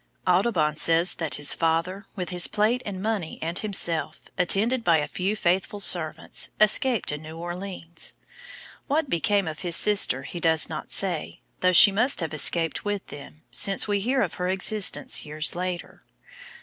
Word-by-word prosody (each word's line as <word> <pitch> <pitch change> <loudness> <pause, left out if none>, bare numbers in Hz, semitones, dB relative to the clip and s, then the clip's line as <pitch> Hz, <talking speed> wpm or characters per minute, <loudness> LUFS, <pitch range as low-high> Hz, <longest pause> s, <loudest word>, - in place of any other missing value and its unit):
Audubon 180 -5 +1
says 165 +3 +4
that 155 -6 -4
his 145 0 +2
father 165 +5 -2
with 180 -3 -5
his 180 -1 +2
plate 220 +4 0
and 190 -2 -6
money 210 -7 -3
and 165 +3 -3
himself, 185 -6 -1 0.2
attended 215 +7 0
by 170 -5 +3
a 150 - -2
few 195 +3 -3
faithful 190 +1 -1
servants, 170 -5 0
escaped 220 +1 +2
to 150 - -3
New 160 +1 -11
Orleans. 175 0 -7 0.7
What 295 0 -1
became 200 +2 0
of 155 -1 -6
his 175 -2 0
sister 210 -1 +4
he 175 - -8
does 160 -1 +1
not 155 -1 -7
say, 180 -5 -2 0.2
though 185 - +2
she 185 +3 +9
must 245 +8 0
have 165 -3 -4
escaped 165 +1 +1
with 205 -1 -4
them, 145 +2 -12
since 195 +1 +1
we 205 -1 0
hear 255 +5 0
of 175 - -4
her 180 - -1
existence 195 +2 +2
years 150 0 -2
later. 180 0 -6
180 Hz, 165 wpm, -24 LUFS, 165-205 Hz, 0.7 s, she